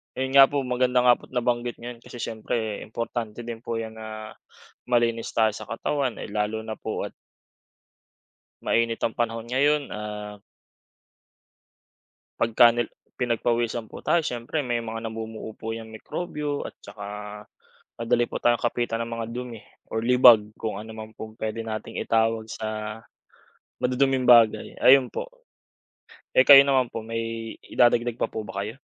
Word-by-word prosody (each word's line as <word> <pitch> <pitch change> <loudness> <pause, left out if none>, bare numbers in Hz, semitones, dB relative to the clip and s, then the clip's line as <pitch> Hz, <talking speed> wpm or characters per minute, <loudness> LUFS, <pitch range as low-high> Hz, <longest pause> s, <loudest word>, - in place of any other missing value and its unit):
Ayun 130 0 -2
nga 135 - +10
po, 140 -1 -1
maganda 125 0 +2
nga 125 -1 +5
po - - -15
at - - -23
nabanggit 120 0 0
niyo 120 +1 -7
'yan 115 - -12
kasi - - -13
siyempre 110 -1 -3
importante 115 0 -5
din 115 -1 -6
po 115 -1 -4
'yan 110 0 -5
na 110 0 -7 0.6
malinis 115 -2 +1
tayo 110 -1 +4
sa 105 - -9
katawan, 140 -4 -1
eh, 100 - -8
lalo 105 +1 -1
na 110 -1 -6
po 460 +3 -3
at - - -5 1.5
mainit 115 0 +1
ang 115 - +2
panahon 115 -1 -1
ngayon, 145 +3 +2
ah 105 -1 -6 2.0
pagka 115 +1 +6
nil 120 0 -1 0.2
pinagpawisan 120 -1 0
po - - -11
tayo 170 - +3
siyempre 125 +1 -3
may 120 -4 -1
mga 115 0 -5
namumuo 110 -1 -7
po 115 0 -5
'yang 115 0 -6
mikrobyo 145 +5 -4
at - - -11
tsaka 100 -1 -9 0.9
madali 120 +1 +2
po - - -3
tayong 120 -1 +2
kapitan 120 -1 -1
ng 115 0 -6
mga 115 - -3
dumi 125 -2 -6 0.3
or 110 - -2
libag 120 -2 +7
kung 105 -3 -4
ano 110 +1 -8
man 110 0 -8
pong 110 0 -8
puwede 110 0 -4
nating 110 -1 -5
itawag 115 0 +1
sa 110 0 -5 0.8
maduduming 130 +1 +2
bagay, 115 -3 +5
ayun 130 -1 +6
po. - - -4 1.1
Eh, 130 - +5
kayo 140 -1 +11
naman 135 -3 +2
po 115 - -6
may 115 0 -4
idadagdag 120 -1 +2
pa - - -1
po 110 - -4
ba 100 +1 -4
kayo? 110 +6 -7
115 Hz, 160 wpm, -25 LUFS, 110-125 Hz, 2.0 s, kayo